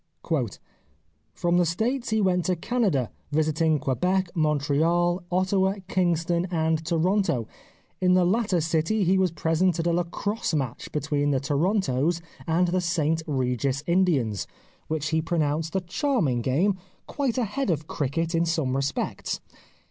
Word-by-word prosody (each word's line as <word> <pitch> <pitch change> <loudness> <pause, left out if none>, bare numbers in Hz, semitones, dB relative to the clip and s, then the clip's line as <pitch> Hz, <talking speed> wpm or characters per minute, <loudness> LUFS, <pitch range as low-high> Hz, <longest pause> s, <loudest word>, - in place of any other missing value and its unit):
" - - -40
From 175 0 +1
the 175 - +4
States 235 - -1
he 220 -1 +2
went 180 -3 +2
to 185 - +1
Canada, 180 - 0 0.2
visiting 155 +1 +2
Quebec, 180 +7 0
Montreal, 160 +3 +2
Ottawa, 190 +1 +2
Kingston, 175 -1 +1
and 160 -2 0
Tor 165 +1 +1
onto; 190 - +1 0.6
in 180 0 +4
the 180 -1 +4
latter 195 -2 +1
city 165 +7 +1
he 190 +2 +3
was 185 -1 +3
present 165 +2 +1
at 165 - -1
a 170 - +2
Lacrosse 175 +2 -1
match 130 -5 -3
between 145 -1 0
the 135 -2 +2
Torontos 155 +1 +1 0.3
and 170 +2 +2
the 185 +1 +1
St 165 -2 0
Regis 130 0 -1
Indians, 155 - +1 0.4
which 155 -1 -2
he 160 +1 +1
pronounced 160 0 -1
a 190 - +2
charm 240 - 0
ing 120 -1 0
game, 180 - +1 0.3
quite 270 -4 -2
ahead 250 +1 -1
of 155 -3 0
cricket 160 +4 -2
in 165 0 +2
some 155 -6 0
respects. 135 +1 -2
170 Hz, 150 wpm, -26 LUFS, 150-185 Hz, 0.6 s, the